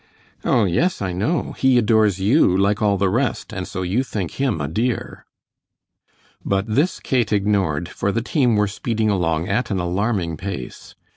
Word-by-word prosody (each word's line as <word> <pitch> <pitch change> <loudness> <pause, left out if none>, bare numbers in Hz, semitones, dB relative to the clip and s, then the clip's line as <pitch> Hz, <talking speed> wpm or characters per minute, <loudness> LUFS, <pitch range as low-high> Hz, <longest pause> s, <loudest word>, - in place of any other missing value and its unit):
"Oh, 115 - +3
yes, 165 - +1
I 95 -2 -2
know, 110 - -1
he 130 -1 +4
adores 110 -4 +3
you 100 - +3
like 100 +3 +1
all 100 -2 +2
the 100 +1 +1
rest, 120 +2 -1
and 95 -3 -4
so 95 - -4
you 100 +9 0
think 100 -9 -4
him 130 - 0
a 75 - -2
dear." 115 - -3 1.2
But 100 0 0
this 135 +11 0
Kate 125 -4 0
ignored 95 -6 +1
for 100 - -2
the 115 +2 -1
team 125 -4 +2
were 105 0 +2
speeding 110 +1 -1
along 85 -3 0
at 110 +4 -1
an 100 - -1
alarming 90 -1 -1
pace. 90 -8 -7
105 Hz, 170 wpm, -21 LUFS, 95-115 Hz, 1.2 s, he